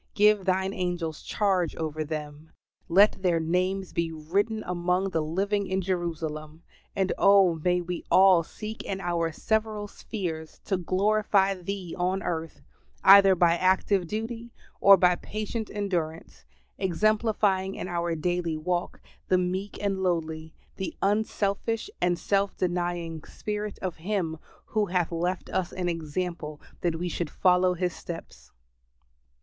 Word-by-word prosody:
Give 210 -3 +4
thine 190 +1 +1
angels 175 -4 -3
charge 190 -6 0
over 155 -1 -3
them; 150 0 -7 0.4
let 195 +3 +5
their 175 -3 +2
names 185 +3 -1
be 170 -1 -1
written 195 +8 -1
among 180 +2 0
the 165 - 0
living 195 +6 -1
in 190 0 0
Jerusalem; 160 -4 -3 0.3
and 190 -1 +1
oh, 195 -4 +5
may 180 0 +2
we 175 0 -5
all 190 -2 +6
seek 215 +6 -7
in 195 -1 -4
our 170 -2 -1
several 215 +3 -1
spheres 170 -7 -6
to 190 - 0
glorify 195 +2 +2
Thee 185 -1 -5
on 185 +2 -1
earth, 165 -1 -4 0.4
either 195 -1 +8
by 170 -1 +4
active 185 +1 +2
duty 230 +4 -5 0.3
or 200 0 +8
by 180 -1 +4
patient 215 +1 -4
endurance; 175 -6 -3 0.3
exemplifying 200 0 +1
in - - -5
our 170 -1 -1
daily 170 0 -1
walk 175 +2 -2 0.3
the 185 - +4
meek 185 +3 -2
and 195 -2 -1
lowly, 160 -3 -2 0.2
the 190 - -4
unselfish 215 - 0
and 175 0 +2
self 200 +3 0
denying, 175 -3 -2
spirit 210 -1 -5
of 185 -3 -3
Him, 165 -3 -2 0.3
who 215 -1 0
hath 175 -2 0
left 175 +2 -2
us 185 -2 -1
an 180 -1 -3
example 165 -1 -3 0.2
that 170 -2 0
we 175 +2 -3
should 170 -2 -3
follow 180 +1 +3
His 180 0 -1
steps. 170 -1 -9
180 Hz, 140 wpm, -27 LUFS, 170-195 Hz, 0.4 s, either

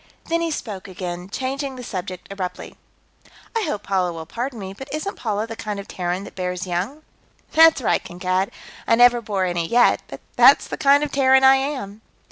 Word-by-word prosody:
Then 335 0 -1
he 335 - 0
spoke 210 -11 -5
again, 180 -1 -6
changing 270 +4 -3
the 250 - -8
subject 185 -4 -6
abruptly. 190 -2 -6 0.8
"I 455 - +1
hope 210 -8 -3
Paula 185 -2 0
will 165 -1 -7
pardon 245 - -4
me, 190 -2 -6
but 265 +7 -10
isn't 310 +7 -3
Paula 215 -2 -2
the 225 0 -7
kind 210 -2 -5
of 200 - -8
Terran 180 +1 -3
that - - -10
bears 180 0 -3
young?" 190 - -3 0.5
"That's 320 -4 +6
right, - - +1
Kankad. 185 +2 -1 0.4
I - - +5
never 245 0 +5
bore 200 -4 -1
any, 175 -2 -1
yet, 240 +4 +4
but - - -10
that's 255 +3 +6
the - - -5
kind 285 -1 +4
of 295 - -3
Terran 265 -1 +4
I 265 0 +7
am." 260 -7 -4
215 Hz, 195 wpm, -22 LUFS, 185-270 Hz, 0.8 s, I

